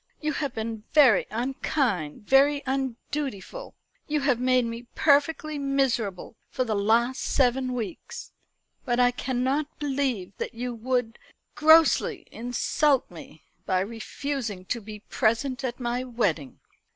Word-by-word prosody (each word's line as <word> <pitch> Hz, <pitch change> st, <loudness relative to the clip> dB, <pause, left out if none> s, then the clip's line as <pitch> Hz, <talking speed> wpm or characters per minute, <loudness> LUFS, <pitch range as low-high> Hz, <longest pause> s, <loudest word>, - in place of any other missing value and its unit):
You 305 Hz, 0 st, -1 dB
have 280 Hz, -3 st, -3 dB
been 220 Hz, -1 st, -4 dB
very 265 Hz, -10 st, +6 dB
unkind, 230 Hz, -, -1 dB
very 280 Hz, +4 st, +4 dB
undutiful. 270 Hz, -, -4 dB, 0.3 s
You 300 Hz, -1 st, 0 dB
have 270 Hz, -4 st, +2 dB
made 255 Hz, -1 st, +3 dB
me 230 Hz, +1 st, -6 dB
perfectly 305 Hz, +1 st, +2 dB
miserable 260 Hz, -9 st, -1 dB
for 255 Hz, -, -1 dB
the 225 Hz, -3 st, -2 dB
last 230 Hz, +5 st, +2 dB
seven 255 Hz, 0 st, +1 dB
weeks; 230 Hz, -5 st, -6 dB, 0.5 s
but 240 Hz, 0 st, 0 dB
I 245 Hz, 0 st, +5 dB
cannot 260 Hz, +4 st, -2 dB
believe 265 Hz, -10 st, -2 dB
that -, -, -4 dB
you 245 Hz, +1 st, -3 dB
would 235 Hz, 0 st, -2 dB, 0.3 s
grossly 315 Hz, +1 st, +4 dB
insult 245 Hz, +3 st, 0 dB
me 160 Hz, -2 st, -12 dB, 0.2 s
by 185 Hz, -1 st, +2 dB
refusing 225 Hz, -1 st, -4 dB
to 235 Hz, +4 st, -3 dB
be 210 Hz, 0 st, -9 dB
present 250 Hz, +5 st, 0 dB
at 245 Hz, -1 st, -3 dB
my 245 Hz, 0 st, -2 dB
wedding." 200 Hz, -, -2 dB
250 Hz, 125 wpm, -26 LUFS, 225-275 Hz, 0.5 s, very